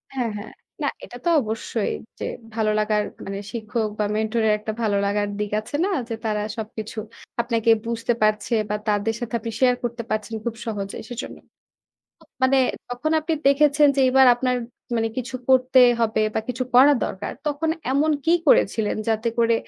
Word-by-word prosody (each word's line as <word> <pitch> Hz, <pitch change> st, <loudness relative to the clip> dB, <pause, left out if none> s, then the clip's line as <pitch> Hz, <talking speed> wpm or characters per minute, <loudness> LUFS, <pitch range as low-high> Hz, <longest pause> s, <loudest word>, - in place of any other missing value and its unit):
হ্যাঁ, 245 Hz, -3 st, 0 dB
হ্যাঁ। 205 Hz, -, -8 dB, 0.3 s
না -, -, +1 dB, 0.2 s
এটা 245 Hz, -, -10 dB
তো -, -, +3 dB
অবশ্যই 220 Hz, -1 st, -2 dB, 0.3 s
যে -, -, -3 dB, 0.3 s
ভালো 220 Hz, -1 st, +1 dB
লাগার 210 Hz, 0 st, +1 dB, 0.2 s
মানে 195 Hz, 0 st, -4 dB
শিক্ষক 220 Hz, -1 st, -2 dB
বা 210 Hz, -, +2 dB
মেন্টরের 220 Hz, 0 st, +1 dB
একটা 220 Hz, +1 st, -4 dB
ভালো 210 Hz, -3 st, +1 dB
লাগার 205 Hz, +1 st, 0 dB
দিক 210 Hz, -1 st, -2 dB
আছে 220 Hz, +6 st, -7 dB
না? -, -, 0 dB, 0.2 s
যে 230 Hz, -, -2 dB
তারা 210 Hz, -1 st, 0 dB, 0.2 s
সবকিছু 220 Hz, 0 st, -6 dB, 0.4 s
আপনাকে 230 Hz, -1 st, 0 dB, 0.2 s
বুঝতে 230 Hz, +1 st, -1 dB
পারছে 215 Hz, +2 st, +1 dB, 0.2 s
বা 210 Hz, -, 0 dB
তাদের 210 Hz, +1 st, +1 dB
সাথে 240 Hz, -2 st, -6 dB
আপনি 230 Hz, +1 st, -5 dB
শেয়ার 250 Hz, -1 st, +4 dB
করতে 235 Hz, 0 st, -3 dB
পারছেন 215 Hz, +1 st, -2 dB
খুব 235 Hz, -1 st, -2 dB
সহজেই 200 Hz, -3 st, -4 dB
সেজন্য। 245 Hz, +1 st, -6 dB, 0.8 s
মা -, -, -21 dB, 0.2 s
মানে 265 Hz, +1 st, +4 dB, 0.3 s
যখন 245 Hz, +6 st, -2 dB
আপনি 320 Hz, +1 st, -1 dB
দেখেছেন 295 Hz, +1 st, +5 dB
যে -, -, +3 dB
এবার 265 Hz, 0 st, +6 dB
আপনার 250 Hz, +1 st, 0 dB, 0.4 s
মানে 225 Hz, 0 st, +1 dB
কিছু 250 Hz, 0 st, -5 dB
করতে 260 Hz, 0 st, +4 dB, 0.2 s
হবে 220 Hz, -1 st, +2 dB
বা -, -, +1 dB
কিছু 250 Hz, +1 st, -2 dB
করা 270 Hz, +4 st, +8 dB
দরকার, 190 Hz, -, -4 dB
তখন 295 Hz, +2 st, -1 dB, 0.2 s
এমন 295 Hz, +3 st, +2 dB
কী 330 Hz, -, +3 dB
করেছিলেন 215 Hz, -5 st, +3 dB
যাতে 225 Hz, +1 st, +1 dB
করে 230 Hz, 0 st, +4 dB
230 Hz, 175 wpm, -23 LUFS, 215-255 Hz, 0.8 s, করা